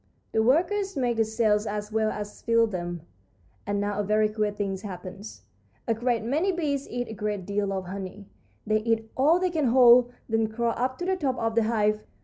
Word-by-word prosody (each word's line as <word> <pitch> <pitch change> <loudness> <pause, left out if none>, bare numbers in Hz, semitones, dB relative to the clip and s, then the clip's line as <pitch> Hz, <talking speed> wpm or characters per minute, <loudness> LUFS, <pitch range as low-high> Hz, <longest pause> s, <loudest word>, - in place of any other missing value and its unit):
"The 220 - +2
workers 355 - +1
make 245 -3 0
the 225 - +4
cells 220 -1 +1
as 210 0 -4
well 220 0 +1
as 210 -1 -6
fill 230 0 +3
them, 175 -5 -5 0.6
and 205 0 0
now 205 0 -2
a - - +1
very 215 +1 +2
queer 215 -1 0
thing 205 -2 -3
happens. 190 +1 -9 0.4
A 230 - +3
great 235 0 0
many 305 - +1
bees 290 -6 -2
eat 245 0 -3
a - - -7
great 210 -2 -3
deal 200 0 -1
of 190 -1 -3
honey. 195 +2 -7 0.4
They 215 0 +2
eat 225 0 -1
all 300 +6 +4
they 370 -1 0
can 315 -4 0
hold, 245 0 +6 0.2
then 225 -1 +1
crawl 230 +1 -1
up 255 +1 -1
to 355 - -4
the 380 +1 +1
top 275 -8 -1
of 225 0 -1
the 230 -1 +2
hive. 215 -1 +1
220 Hz, 205 wpm, -26 LUFS, 205-245 Hz, 0.6 s, hold